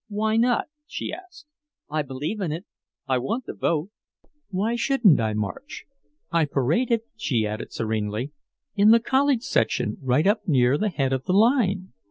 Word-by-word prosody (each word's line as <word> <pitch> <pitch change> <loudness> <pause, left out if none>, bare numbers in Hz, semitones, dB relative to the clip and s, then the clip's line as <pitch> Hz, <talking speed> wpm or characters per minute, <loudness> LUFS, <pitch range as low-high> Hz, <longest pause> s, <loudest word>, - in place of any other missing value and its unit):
"Why 215 +1 0
not?" 245 - +2 0.2
she - - -5
asked. 365 -4 -11 0.4
"I 155 +1 -1
believe 145 +9 -4
in 175 -5 -1
it, 165 +6 -5 0.4
I 130 -2 +2
want 225 - -3
the - - -6
vote. 170 +4 -1 0.6
Why 205 +4 -1
shouldn't 235 - +4
I 110 -2 0
march? 270 - -5 0.5
I 165 -2 +3
paraded," 165 - +1
she 125 - 0
added 105 +1 -5
serenely, 110 +3 -2 0.4
"in 205 0 +5
the 230 +1 +7
college 265 0 +2
section - - 0
right 130 +3 +2
up 210 +1 +1
near 130 -4 +3
the 215 - +1
head 135 -7 -1
of 130 0 -2
the 185 - 0
line. 200 -4 +2
185 Hz, 165 wpm, -24 LUFS, -, 0.6 s, the